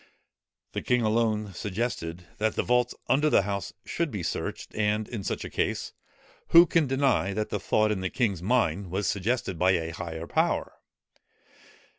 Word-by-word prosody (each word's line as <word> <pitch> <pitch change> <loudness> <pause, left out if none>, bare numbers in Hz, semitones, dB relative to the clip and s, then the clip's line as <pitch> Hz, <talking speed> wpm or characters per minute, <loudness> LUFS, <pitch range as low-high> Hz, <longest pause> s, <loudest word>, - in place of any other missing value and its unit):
The - - -3
king 125 -1 +1
alone 110 -2 +1
suggested, 90 -4 -3
that 110 0 +1
the - - +1
vaults 125 0 +2
under 145 +4 +3
the 100 - +4
House 100 0 -3
should 170 -1 -1
be 105 -8 -4
searched: - - -4
and 105 0 0
in 110 -5 -5
such - - -3
a - - -6
case, - - -1 0.5
who 170 +1 +8
can 165 -3 +2
deny, 130 -7 +2
that 105 +1 -2
the 105 - -2
thought 110 +3 +2
in 100 -3 -1
the 95 - -1
king's 100 -8 0
mind 100 -4 +1
was 95 +3 -2
suggested 100 -2 -1
by 95 +1 +4
a 80 -2 -1
higher 80 -1 -5
power? - - 0
105 Hz, 170 wpm, -27 LUFS, 95-120 Hz, 0.5 s, who